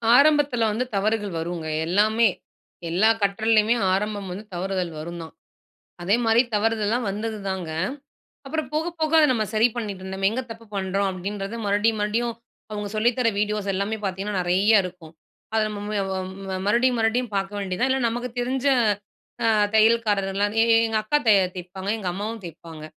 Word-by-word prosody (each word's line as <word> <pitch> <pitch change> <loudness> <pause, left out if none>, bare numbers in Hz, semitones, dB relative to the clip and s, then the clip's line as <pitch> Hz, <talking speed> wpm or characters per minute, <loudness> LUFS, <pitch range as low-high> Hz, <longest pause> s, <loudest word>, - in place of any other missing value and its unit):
ஆரம்பத்தில 285 -3 +4
வந்து 240 +4 -1
தவறுகள் 205 -1 0
வருங்க. 165 0 -4 0.2
எல்லாமே 215 +5 +3 0.6
எல்லா 190 +7 +3
கற்றலேயுமே 215 +2 +3 0.2
ஆரம்பம் 205 0 -2
வந்து 195 +4 -6
தவறுதல் 180 -1 -2
வரும் 170 +2 -6
தான். 160 - -11 0.7
அதேமாதிரி 225 +5 +3
தவறுதல்லலாம் 225 +2 +1
வந்தது 215 +2 -4
தாங்க. 185 -4 -3 0.8
அப்புறம் 305 0 -3
போக 315 +2 0
போக 310 -1 +1
அத 315 - +7
நம்ம 220 -3 0
சரி 220 +2 +5
பண்ணிட்டு 205 -5 -4
இருந்தோம். 190 0 -6
"நம்ம 195 0 +2
எங்கே 250 +4 -2
தப்பு 225 0 -9
பண்றோம்?" 195 +1 0
அப்டின்றது 195 +3 -5
மறுபடியும் 210 +2 +2
மறுபடியும் 230 +3 0 0.4
அவங்க 210 -1 -4
சொல்லி 220 +3 +3
தர 250 -2 +3
வீடியோஸ் 210 -1 -1
எல்லாமே 200 +3 -1
பார்த்திங்கன்னா, 195 +2 -3
நெறையா 190 +5 +3
இருக்கும். 175 -3 -9 0.4
அத 220 - +3
நம்ம 210 -1 -6
ம 210 - -3 0.2
வ 190 - -2 0.4
ம-மறுபடியும் 235 +6 +2
மறுபடியும் 225 +1 0
பார்க்க 195 +1 -2
வேண்டியது 190 -2 -3
தான். 260 +2 +2
இல்ல 265 0 +1
நமக்கு 240 +2 -3
தெரிஞ்ச, 260 +2 -1 0.8
அ - - +4 0.3
தையல்காரர்லாம் 210 -2 +2
எ - - +5
எ - - +6
எங்க 225 -1 0
அக்கா 255 +8 +2
தைய 205 -3 +6 0.2
தைய்ப்பாங்க. 185 +2 -5
எங்க 195 -4 -3
அம்மாவும் 215 +5 -4
தைய்ப்பாங்க. 165 -2 -10
210 Hz, 160 wpm, -24 LUFS, 195-230 Hz, 0.8 s, அத